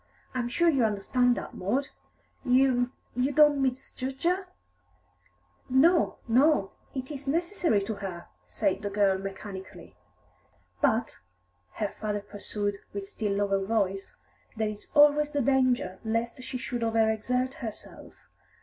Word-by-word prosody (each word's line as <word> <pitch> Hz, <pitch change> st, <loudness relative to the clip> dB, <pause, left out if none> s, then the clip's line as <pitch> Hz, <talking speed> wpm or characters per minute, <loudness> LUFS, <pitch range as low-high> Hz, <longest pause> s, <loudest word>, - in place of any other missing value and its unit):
I'm 245 Hz, -2 st, -1 dB
sure 340 Hz, +8 st, +2 dB
you 275 Hz, -7 st, +4 dB
understand 240 Hz, +4 st, +2 dB
that, -, -, -6 dB
Maud? 250 Hz, +10 st, -1 dB, 0.5 s
You 250 Hz, -1 st, +3 dB, 0.2 s
you 255 Hz, +3 st, +1 dB
don't 295 Hz, -1 st, +5 dB
misjudge 265 Hz, 0 st, -3 dB
her?" 365 Hz, +2 st, +1 dB, 1.2 s
"No, 320 Hz, +7 st, +4 dB
no; 255 Hz, -3 st, +3 dB, 0.2 s
it 260 Hz, +2 st, -4 dB
is 280 Hz, -1 st, -7 dB
necessary 335 Hz, -, +1 dB
to 220 Hz, -, -3 dB
her," 185 Hz, -4 st, -6 dB, 0.2 s
said 140 Hz, -, 0 dB
the 205 Hz, -, -3 dB
girl 200 Hz, -2 st, +2 dB
mechanically. 195 Hz, 0 st, -8 dB, 0.9 s
"But," 235 Hz, -5 st, +1 dB, 0.5 s
her 210 Hz, -, -2 dB
father 210 Hz, 0 st, -3 dB
pursued, 205 Hz, 0 st, -4 dB
with 200 Hz, -1 st, -5 dB
still 205 Hz, 0 st, -2 dB
lower 200 Hz, -1 st, +1 dB
voice, 195 Hz, -2 st, -1 dB, 0.4 s
"there 215 Hz, -1 st, 0 dB
is 210 Hz, -1 st, -9 dB
always 295 Hz, 0 st, +6 dB
the 290 Hz, -1 st, -1 dB
danger 255 Hz, -7 st, +2 dB
lest 230 Hz, +2 st, -2 dB
she 255 Hz, 0 st, -5 dB
should 245 Hz, -1 st, -4 dB
over 225 Hz, -1 st, +3 dB
exert 250 Hz, +4 st, -1 dB
herself. 220 Hz, -4 st, -9 dB
235 Hz, 130 wpm, -28 LUFS, 205-270 Hz, 1.2 s, always